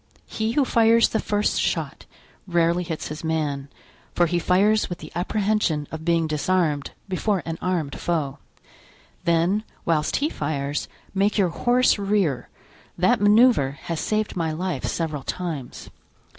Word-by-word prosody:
He 220 +1 -2
who 285 0 +3
fires 230 -1 +4
the 220 - 0
first 210 0 0
shot - - -2 0.4
rarely 170 0 +2
hits 165 -2 -5
his 150 +1 -7
man, 150 -4 -2 0.5
for 175 - +4
he 175 +1 0
fires 205 +5 +3
with 175 - -4
the - - -11
apprehension 195 -5 0
of 160 0 -6
being 165 -1 +2
disarmed, 155 -1 0 0.2
before 195 0 -1
an 165 0 -4
armed 170 -6 -2
foe; 155 -6 -2 0.9
then, 170 +5 +2 0.2
whilst 155 -2 +1
he 290 - +1
fires, 145 - -3 0.3
make 200 +2 +1
your 190 -4 +3
horse 245 +6 +2
rear; 195 -10 0 0.5
that 220 +7 +3
manoeuvre 205 - +5
has 165 -2 -3
saved 215 0 -1
my 165 -3 -1
life 170 -3 -3
several 155 -4 -2
times." 155 -5 -5
175 Hz, 145 wpm, -24 LUFS, 155-210 Hz, 0.9 s, manoeuvre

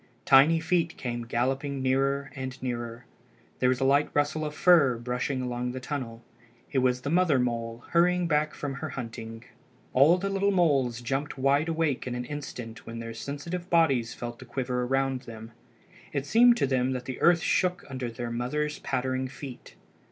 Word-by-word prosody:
Tiny 140 +5 +6
feet 165 0 0
came 120 -2 -4
galloping 135 +4 -1
nearer 135 +1 0
and 130 -1 -6
nearer. 120 -1 -4 0.5
There 125 - +3
was 130 - +1
a - - 0
light 140 +2 +3
rustle 145 +2 +1
of 150 0 -4
fur 155 -9 +5
brushing 125 +2 -2
along 125 0 -3
the 130 - -4
tunnel. 125 -4 -5 0.5
It 135 - +2
was 125 -1 +1
the 140 - -3
mother 170 -5 +3
mole 115 -1 -2
hurrying 180 +1 +3
back 155 -1 +1
from 145 -2 -4
her 155 - -3
hunting. 115 -3 -7 0.5
All 145 +7 +6
the 195 +2 -2
little 195 +1 +1
moles 140 -11 +2
jumped 135 +5 -3
wide 140 +4 +2
awake 160 -6 0
in 125 - -3
an 125 0 -4
instant 125 -5 -7
when 115 - -6
their 115 0 -6
sensitive 170 +9 -5
bodies 135 -9 +2
felt 120 -1 -6
the 130 - -10
quiver 125 0 -2
around 135 0 0
them. 110 0 -9 0.6
It 140 -1 -1
seemed 240 +7 +6
to - - +2
them 130 -1 +1
that 125 -1 -4
the 130 -1 -6
earth 170 -1 +5
shook 180 +1 +1
under 130 -3 -4
the 120 +1 -5
mother's 150 +6 -2
pattering 130 +1 -1
feet. 135 -1 -10
135 Hz, 180 wpm, -28 LUFS, 125-150 Hz, 0.6 s, Tiny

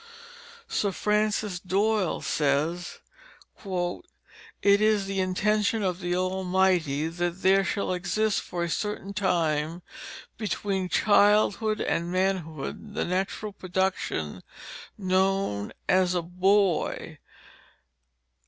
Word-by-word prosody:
Sir 200 - 0
Francis 210 -2 0
Doyle 200 +1 0
says, 155 +4 -1 0.6
"It 200 - -2
is 215 -2 +3
the 195 0 -2
intention 210 +3 +1
of 180 -2 -1
the 175 -1 -1
Almighty 185 -5 +1
that 175 +2 -3
there 195 +1 +5
should 200 0 -1
exist 215 +4 0
for 175 -1 -4
a 170 - -2
certain 205 0 -3
time 170 -4 0 0.6
between 200 -3 -2
childhood 210 +2 +3
and 170 +1 -1
manhood, 185 +1 -2
the - - 0
natural 190 +3 -2
production 185 - -2 0.6
known 190 - 0 0.2
as 185 -1 +3
a 175 - 0
boy." 185 +1 +1
190 Hz, 95 wpm, -27 LUFS, 175-205 Hz, 0.6 s, there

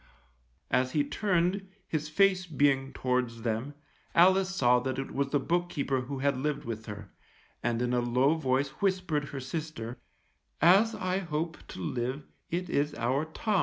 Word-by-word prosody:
As 130 0 +2
he 150 - +3
turned, 190 +3 0 0.2
his 155 -1 -2
face 185 +2 +3
being 140 -3 +2
towards 125 -3 -1
them, 120 +5 -2 0.4
Alice 185 +2 +5
saw 125 -10 +3
that 130 +1 -3
it 135 - -4
was 140 0 -1
the 145 - +2
book 175 +5 0
keeper 140 -4 -1
who 135 +2 -5
had 140 0 +1
lived 145 +1 -2
with 110 -1 -5
her, 105 -2 -8 0.5
and 120 0 0
in 125 0 0
a 125 - +3
low 125 +5 +3
voice 135 -3 +1
whispered 185 -6 +1
her 140 -1 -6
sister, 135 -3 -5 0.6
_As 195 +8 +5
I 185 +1 0
hope 165 -2 -3
to - - -9
live, 125 - -2 0.2
it 180 +2 -2
is 145 -2 0
our 130 +6 0
Tom. 200 +5 0
145 Hz, 165 wpm, -29 LUFS, 125-170 Hz, 0.6 s, Alice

